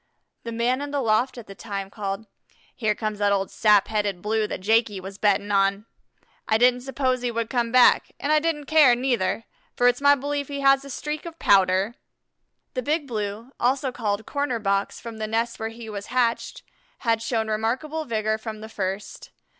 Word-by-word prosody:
The 230 - -6
man 240 +3 0
in 290 - -4
the 285 0 -1
loft 240 +1 +1
at 235 - -8
the 195 - -10
time 195 -1 -6
called: 200 0 -4 0.5
"Here 215 -4 0
comes 215 -1 -3
that 205 -1 +2
old 195 -1 0
sap 210 -2 +4
headed 205 -4 -1
Blue 215 0 0
that - - -5
Jakey 220 0 +2
was 195 +1 -9
betting 205 0 +2
on. 200 +1 +2 0.6
I 220 - +3
didn't 250 +1 +4
suppose 260 -1 -1
he 245 - -1
would 230 -1 -3
come 240 -3 0
back, 250 0 +5
and 290 - -1
I 305 - +5
didn't 300 -2 -2
care, 290 -5 +6
neither, 240 -4 0 0.3
for 245 - +3
it's 245 +2 +2
my 285 0 +6
belief 285 +1 -3
he 280 -1 -5
has 275 0 +5
a 280 - -10
streak 300 +3 -4
of 330 -1 -9
Pouter." 195 - +3 0.8
The 255 - -2
Big 295 +4 0
Blue, 215 +1 -4
also 260 +2 +1
called 210 -2 -2
"Corner 285 -4 -1
box" 200 -2 -1
from 230 -1 -8
the 215 - -2
nest 230 +2 -1
where 220 0 -3
he 225 0 -10
was 205 -2 -6
hatched, 240 -2 -1 0.4
had 230 -2 +1
shown 230 -1 -1
remarkable 250 +9 -1
vigor 220 -2 -1
from 220 -1 -7
the 220 - -8
first. 195 -1 -5
230 Hz, 195 wpm, -24 LUFS, 210-255 Hz, 0.8 s, care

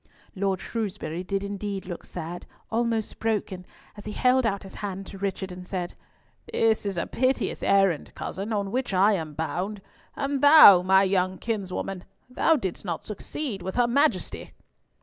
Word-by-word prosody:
Lord 190 -1 0
Shrewsbury 200 -7 -4
did 195 +1 -2
indeed 200 -1 -4
look 175 -2 -7
sad, 175 0 -7 0.2
almost 230 -1 -1
broken, 200 -5 -2 0.3
as 205 - -11
he 210 - -5
held 255 0 +3
out 200 -2 -2
his 195 - -11
hand 195 -1 -4
to 195 - -10
Richard, 195 -1 -3
and 180 0 -9
said, 180 -2 -4 0.6
"This 220 -2 +2
is 195 -3 -3
a 170 - 0
piteous 260 +1 0
errand, 195 -5 +2
cousin, 200 +4 -5
on 200 -2 -1
which 245 -4 -1
I 200 +3 +5
am 160 -5 -3
bound. 180 +7 -3 0.4
And 275 -1 -2
thou, 285 - +9
my 190 +1 +5
young 185 -1 +1
kinswoman, 195 -4 -3 0.2
thou 270 +6 +2
didst 190 - -4
not 170 -5 -4
succeed 215 +1 -5
with 185 +1 -5
her 245 - +4
Majesty!" 235 - 0
195 Hz, 165 wpm, -26 LUFS, 185-225 Hz, 0.6 s, thou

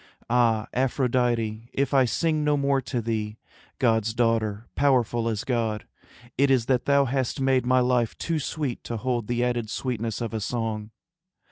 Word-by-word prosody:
Ah, 115 -3 +3
Aphrodite, 120 -3 0
if 140 0 0
I 135 -2 +5
sing 155 +5 0
no 150 -1 +2
more 140 -1 +1
To 125 -1 -3
thee, 110 -1 -3 0.4
God's 110 -3 +1
daughter, 115 -2 0
powerful 120 -4 +2
as 110 -2 -2
God, 115 -4 -1 0.5
It 140 0 +4
is 130 -4 +3
that 125 -1 +1
thou 140 0 +4
hast 135 +1 -1
made 130 -2 +2
my 130 0 +4
life 125 -2 +1
too 165 -2 -1
sweet 140 -3 -3
To 115 - -3
hold 120 -1 -2
the 120 0 0
added 120 -3 -1
sweetness 115 -3 -3
of 115 -1 -4
a 110 - -1
song. 110 -1 -3
120 Hz, 165 wpm, -25 LUFS, 115-130 Hz, 0.5 s, I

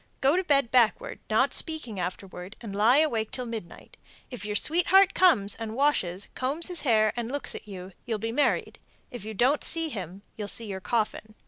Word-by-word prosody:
Go 275 +4 +3
to 370 - +1
bed 275 -8 +2
backward, 255 - +2
not - - +2
speaking 310 - -2
afterwards, 180 +1 -6
and 210 -4 -7
lie 225 +6 +5
awake 235 -9 +1
till 250 - -4
midnight. 225 -7 -8 0.3
If 245 - -7
your 210 0 -3
sweetheart 360 - +4
comes 210 - +4
and 225 -1 -6
washes, 205 -10 0
combs 290 +7 -2
his 360 - -2
hair, 215 -5 +3
and 240 0 -4
looks 285 0 -4
at - - -9
you, 190 -2 -8 0.2
you'll 225 -2 -1
be 225 +2 -3
married. 285 +5 0 0.3
If 240 -5 -8
you 220 0 -6
don't 260 +8 +2
see 330 -1 -1
him, 190 - -7
you'll 210 -2 -5
see 230 +3 0
your 190 -2 -6
coffin. 215 0 -2
230 Hz, 195 wpm, -27 LUFS, 205-290 Hz, 0.3 s, lie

